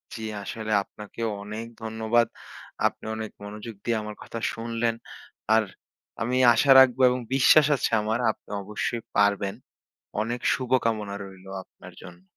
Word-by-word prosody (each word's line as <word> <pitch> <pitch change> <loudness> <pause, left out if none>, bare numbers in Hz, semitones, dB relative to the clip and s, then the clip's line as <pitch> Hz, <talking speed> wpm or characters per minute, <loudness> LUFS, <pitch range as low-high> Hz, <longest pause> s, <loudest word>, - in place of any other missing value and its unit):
জী, 115 - -7 0.2
আসলে 110 +1 -5
আপনাকে 105 +2 -13
ও - - -3
অনেক 110 +2 -6 0.2
ধন্যবাদ। 110 +1 +1 0.6
আপনি - - -8
অনেক 110 -1 -5
মনোযোগ 105 +2 -8
দিয়ে 115 -1 0
আমার 105 0 -7
কথা 115 - -6
শুনলেন। 115 0 -1 0.6
আর 110 0 +5 0.6
আমি 120 +3 0 0.2
আশা 135 +4 +4
রাখব 130 -1 +5
এবং 125 +1 -1
বিশ্বাস 140 +3 +6
আছে 130 - -1
আমার। 110 +2 -1
আপনি - - -19
অবশ্যই 105 +3 -3 0.2
পারবেন। 100 -1 +2 0.7
অনেক 120 +3 -2
শুভকামনা 115 -5 0
রইলো 95 -1 -13
আপনার - - -15
জন্য। 90 0 -12
110 Hz, 140 wpm, -26 LUFS, 105-120 Hz, 0.7 s, বিশ্বাস